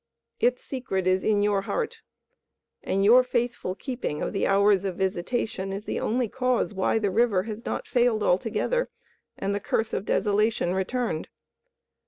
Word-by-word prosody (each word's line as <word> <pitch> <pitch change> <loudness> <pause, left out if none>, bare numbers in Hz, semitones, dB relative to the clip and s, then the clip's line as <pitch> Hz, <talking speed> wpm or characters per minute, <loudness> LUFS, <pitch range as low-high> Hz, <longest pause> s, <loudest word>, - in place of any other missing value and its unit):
Its 250 +1 +1
secret 245 -9 -3
is 185 0 +2
in 205 -1 +2
your 205 -1 +2
heart, 455 - -3 0.8
and 195 +1 0
your 240 +5 +8
faithful 240 -6 -2
keeping 245 - -4
of - - -3
the 195 - +1
hours 200 0 +4
of 190 -3 -2
visitation 190 +2 -2
is 200 +2 -5
the - - -2
only 240 +2 0
cause 255 -1 0
why 190 +3 +1
the 205 -3 0
river 210 -3 +2
has 220 +1 -6
not - - -3
failed 240 -3 +2
altogether 225 - +1 0.5
and 195 +1 -1
the 200 - -1
curse 220 +2 -1
of - - -1
desolation 210 -3 +1
returned. 190 -2 -2
210 Hz, 160 wpm, -26 LUFS, 195-245 Hz, 0.8 s, your